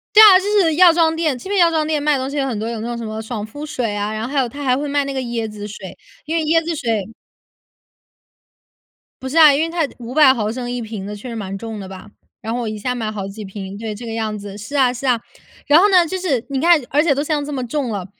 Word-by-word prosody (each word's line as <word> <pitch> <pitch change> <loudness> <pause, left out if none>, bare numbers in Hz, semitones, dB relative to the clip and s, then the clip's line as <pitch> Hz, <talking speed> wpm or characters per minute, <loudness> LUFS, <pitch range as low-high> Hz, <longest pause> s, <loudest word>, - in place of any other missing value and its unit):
对 430 - +10
啊， 410 -4 +10
就 385 - -6 0.2
是 325 -4 +2
药 350 0 +7
妆 325 -1 +2
店， 320 -4 0
这 250 +10 -9
边 400 -1 +1
药 340 -1 +5
妆 315 -1 0
店 310 -2 0
卖 300 +1 +2
的 275 - 0
东 260 +1 -3
西 285 - -5
有 275 - +1
很 250 -5 -3
多 220 +2 -3
有 230 -1 -4
那 230 - -4
种 240 - -3
什 235 - -6
么 215 0 -5
爽 220 -1 -5
肤 290 +8 -8
水 245 -8 -3
啊， 205 +1 -2
然 215 0 -4
后 245 - -5
还 285 - +1
有 260 - +1
它 285 +5 -8
还 255 -2 +2
会 290 +1 -3
卖 285 0 +1
那 275 - -4
个 265 - -2
椰 235 -3 -3
子 210 -1 -7
水， 195 -2 -9 0.3
因 325 +2 -1
为 320 - 0
椰 325 +2 +2
子 335 0 -3
水 225 -6 -2 2.1
不 260 - -5
是 300 - -2
啊， 310 -3 +8
因 280 - +1
为 325 - 0
它 330 -3 0
500ml 245 -2 +2
1 245 0 -3
瓶 215 -3 -6
的 210 +1 -6
确 210 +5 -9
实 230 - -6
蛮 195 -3 -5
重 225 0 -7
的 195 - -7
吧。 190 +2 -11 0.3
然 225 - -4
后 245 - -2
我 235 - -3
一 215 0 -4
下 250 +4 -2
买 225 -3 -3
好 205 -2 -5
几 205 +2 -8
瓶， 195 0 -8
对， 215 0 -5
这 235 +3 -9
个 230 - -5
样 220 -1 -3
子。 200 -1 -8
是 210 +8 -8
啊 260 -3 +4
是 250 +2 -5
啊， 245 -2 +3 0.5
然 300 +2 +6
后 395 - +5
呢， 365 -3 +5
就 375 +4 -3
是 290 -11 -1
你 275 -1 -1
看 335 +1 +5
而 290 - +3
且 305 -3 +2
都 285 - -1
像 300 -1 -1
这 295 - -5
么 255 -3 -3
重 265 +1 -2
了， 200 -4 -4
250 Hz, 315 characters per minute, -19 LUFS, 215-300 Hz, 2.1 s, 对